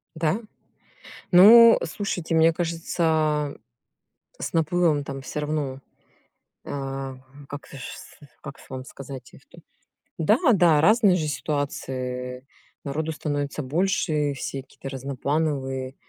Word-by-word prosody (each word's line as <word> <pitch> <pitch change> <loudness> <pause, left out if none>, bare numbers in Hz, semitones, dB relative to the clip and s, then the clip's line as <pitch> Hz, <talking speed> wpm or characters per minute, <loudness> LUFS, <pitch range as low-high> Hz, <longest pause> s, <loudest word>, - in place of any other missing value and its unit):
Да? 160 +7 0 0.9
Ну, 230 +6 +9
слушайте, 180 -6 -3
мне 160 +1 +5
кажется, 160 -3 0 0.9
с - - -4
наплывом 165 -2 +2
там 135 -1 -6
всё 140 +3 -5
равно, 145 -3 -3 0.9
а, 135 -1 -5 0.3
как 145 0 -8
в - - -14
с 135 - -10 0.2
как 140 - -9
с - - -18
вам 130 -1 -6
сказать-то. 135 -2 -11 0.6
Да, 205 +8 +3 0.2
да, 165 -6 +4
разные 210 -1 +5
же 155 -4 -1
ситуации, 130 -3 -4 0.4
народу 155 +3 -3
становится 145 -1 -3
больше, 150 -1 0
все 135 0 -5
какие-то 135 - -10
разноплановые. 135 0 -2
150 Hz, 110 wpm, -24 LUFS, 135-165 Hz, 0.9 s, Ну